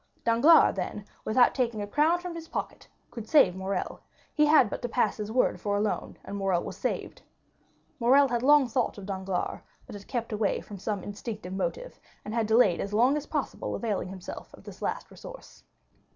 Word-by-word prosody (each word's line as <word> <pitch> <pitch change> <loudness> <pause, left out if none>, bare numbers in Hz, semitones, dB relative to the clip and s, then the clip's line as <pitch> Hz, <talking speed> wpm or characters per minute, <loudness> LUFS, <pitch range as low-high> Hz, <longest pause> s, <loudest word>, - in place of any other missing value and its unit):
Danglars, 240 +9 +6
then, 195 +2 -4 0.2
without 245 +3 +4
taking 235 -4 -1
a 205 - -2
crown 300 +10 +2
from 350 0 -6
his 330 -1 -8
pocket, - - -5 0.2
could 225 -2 -8
save 200 - +5
Morrel; 190 +1 -3 0.3
he 300 0 +3
had 295 -5 +6
but - - -5
to 245 - -3
pass 225 -5 +1
his 210 0 -5
word 250 +2 +1
for 205 -1 0
a - - 0
loan, 210 0 -2
and 200 - -6
Morrel 190 -3 0
was - - -6
saved. - - -4 0.8
Morrel 270 +4 +5
had 240 -2 -1
long 290 0 +5
thought 240 -1 -1
of 200 - -8
Danglars, 190 -2 -3 0.2
but - - -11
had 205 -1 -10
kept 235 -3 -3
away 210 -1 0
from 205 -2 -10
some 205 -1 -3
instinctive 205 -2 -6
motive, - - -4 0.3
and 210 - -5
had 225 -2 0
delayed 220 -5 +4
as 200 +1 -4
long 250 +6 +4
as 300 -1 -4
possible - - -3
availing 210 -6 -2
himself 185 -1 -9
of - - -18
this - - -12
last - - -3
resource. - - -12
225 Hz, 195 wpm, -28 LUFS, 200-260 Hz, 0.8 s, Danglars